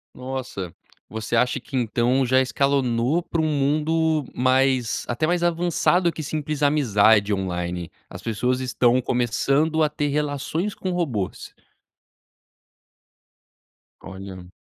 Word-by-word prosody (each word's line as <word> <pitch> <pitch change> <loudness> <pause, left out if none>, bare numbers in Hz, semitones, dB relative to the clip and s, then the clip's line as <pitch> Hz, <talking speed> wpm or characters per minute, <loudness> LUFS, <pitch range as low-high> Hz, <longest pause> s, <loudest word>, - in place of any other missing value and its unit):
Nossa, 125 -9 -6 0.3
você 110 +1 -3
acha 125 +2 +1
que 135 - -7
então 125 +2 +1
já 130 +1 +4
escalonou 135 +2 +1
pra 165 -1 -2
um 155 - +1
mundo 155 +1 +1
mais 130 -1 +1
até 120 +6 -1
mais 175 +1 0
avançado 175 +1 +2
que 155 - -6
simples 150 0 -3
amizade 110 -8 +4
online. 90 -3 -3 0.2
As - - -9
pessoas 125 +3 -1
estão 125 -1 +2
começando 135 +6 +1
a 155 - +3
ter 150 0 -2
relações 150 +6 -2
com 185 - -4
robôs. 135 - -3 2.5
Olha. 95 -2 -9
130 Hz, 115 wpm, -23 LUFS, 115-155 Hz, 2.5 s, já